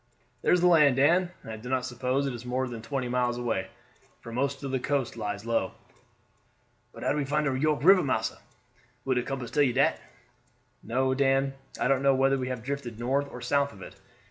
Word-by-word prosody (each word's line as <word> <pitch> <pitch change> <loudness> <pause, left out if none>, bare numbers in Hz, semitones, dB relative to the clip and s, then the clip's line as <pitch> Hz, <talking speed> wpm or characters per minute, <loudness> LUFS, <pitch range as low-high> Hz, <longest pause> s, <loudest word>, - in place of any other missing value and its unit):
"There - - +2
is 180 - +4
the - - +3
land, 150 -6 +6
Dan; 175 +7 +3
and 115 - -8
I 110 - -6
do 120 +3 -9
not 130 -1 0
suppose 130 +2 -1
it 135 - -2
is 120 -1 -7
more 130 +1 -1
than 120 -2 -7
twenty 130 +1 -3
miles 120 -1 0
away, 115 -6 -2 0.5
for 115 - -10
most 140 +3 -2
of 135 - -3
the 130 - 0
coast 135 -2 -1
lies 105 -2 -4
low." 115 0 0 1.2
"But - - -10
how - - +1
we 150 - 0
find 150 +2 0
de 135 -2 0
York 150 +2 +1
River, 190 +2 +7
massa? 130 -7 -1 0.7
Will 135 - +2
de 125 - +1
compass 130 -1 -5
tell 150 - +2
you 130 -4 +3
dat?" 135 +2 +2 0.8
"No, 130 +3 0
Dan. 135 0 +2 0.3
I - - +1
don't 135 0 +2
know 140 -1 +4
whether 135 +1 +2
we 130 - -3
have 125 -3 -4
drifted 130 -4 -4
north 135 +4 0
or 125 - -8
south 140 +3 +1
of 95 - -11
it. - - -11
130 Hz, 220 wpm, -28 LUFS, 125-140 Hz, 1.2 s, River